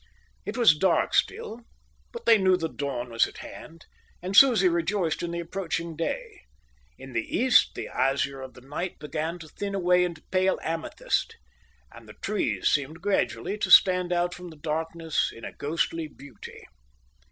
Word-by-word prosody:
It - - -4
was 230 -11 +6
dark 180 +3 +1
still, 240 - -1 0.5
but 470 - -9
they 225 -2 +6
knew 185 -1 +4
the 165 -2 -2
dawn 130 -6 -5
was 115 - +3
at - - -13
hand, 165 0 -11 0.3
and 185 +2 -5
Susie 225 -6 +7
rejoiced 170 0 0
in 175 - -3
the 170 0 -4
approaching 170 -1 -4
day. 440 - -4 0.6
In 135 - -11
the 115 -1 -2
east 255 +1 +4
the - - -5
azure 135 0 -1
of 130 -1 -10
the 125 - -13
night 150 +7 -5
began 155 +3 -4
to 165 -2 -11
thin 200 +5 -5
away 180 -1 +3
into 170 -3 -4
pale 185 0 +2
amethyst, 165 0 -2 0.6
and - - -14
the - - -10
trees - - -1
seemed 155 +5 0
gradually 205 +1 -1
to - - -1
stand 180 -2 +6
out 175 0 +1
from 180 0 -9
the 160 - -12
darkness 160 +1 -2
in 115 - -11
a - - -6
ghostly 165 +1 -2
beauty. 140 -5 -13
170 Hz, 170 wpm, -26 LUFS, 150-190 Hz, 0.6 s, Susie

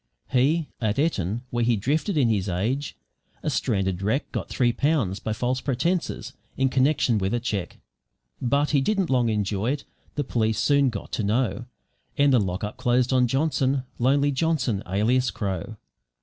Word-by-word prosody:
He, 145 +5 +2
at 110 -2 0
Eton 120 - 0
where 120 0 0
he 120 0 +3
drifted 155 - 0
in 135 -5 +4
his 100 -4 0
age, 115 - -2 0.5
a - - 0
stranded 95 -2 0
wreck 110 +9 -1
got - - -4
three 120 -2 +1
pounds 135 - +1
by 110 - -3
false 125 +4 -1
pretences, 160 +7 -1 0.2
in 135 0 +2
connection 130 -3 +2
with 95 +4 0
a - - 0
cheque. 105 -7 -3 0.6
But 140 +4 +1
he 140 -3 +3
didn't 195 +1 0
long 125 -3 +3
enjoy 105 +3 0
it, 145 - -5 0.3
the 145 - 0
police 110 -4 0
soon 140 -2 +3
got 105 -4 -7
to 110 - -2
know; 120 +3 0 0.5
and 140 -1 +4
the 125 - +5
lockup 100 +1 -3
closed 125 +1 +2
on 125 -1 +4
Johnson, 135 0 +1 0.2
lonely 140 +3 +3
Johnson 135 -7 0
alias 120 +6 +2
Crow. 100 +1 -4
125 Hz, 165 wpm, -25 LUFS, 105-140 Hz, 0.6 s, the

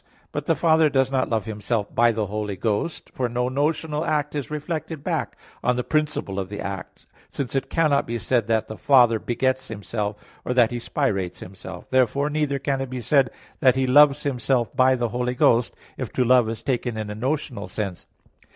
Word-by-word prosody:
But - - -4
the - - +3
Father 160 -2 +4
does 135 -1 +1
not 130 -1 +1
love 110 -3 0
Himself 105 0 -2
by 120 0 +4
the 110 -1 -1
Holy 105 0 -3
Ghost; 110 - -2
for 125 -2 -1
no 125 +1 -1
notional 150 +3 -1
act 150 -2 0
is 145 -3 -4
reflected 155 0 -4
back - - -2 0.3
on 125 - +2
the 125 - -1
principle 150 -11 -1
of 95 -1 -4
the 105 - -6
act; 100 -1 -6 0.2
since 130 -4 -4
it 135 -1 -1
cannot 155 -4 +2
be 120 +1 -2
said 115 0 0
that 110 -1 +1
the 110 - -7
"Father 120 -5 +5
begets 130 +3 -1
Himself," 105 0 -4 0.3
or 125 - -2
that 120 -2 +4
"He 120 - -3
spirates 100 - -1
Himself." 95 0 -10
Therefore, 130 +3 +2
neither 150 -2 0
can 135 0 -1
it 135 - -4
be 130 0 -4
said 130 +2 +3 0.3
that 130 -1 +5
"He 130 0 +1
loves 145 +2 +5
Himself 125 -3 0
by 130 0 +5
the 120 -2 -1
Holy 125 +1 -2
Ghost," 120 -1 +3 0.2
if - - -4
"to 130 - +2
love" 125 -2 +5
is 115 -1 -5
taken 120 -4 -1
in 105 -1 -4
a - - -3
notional 125 -1 -3
sense. 100 -5 -5
125 Hz, 200 wpm, -24 LUFS, 110-140 Hz, 0.3 s, Father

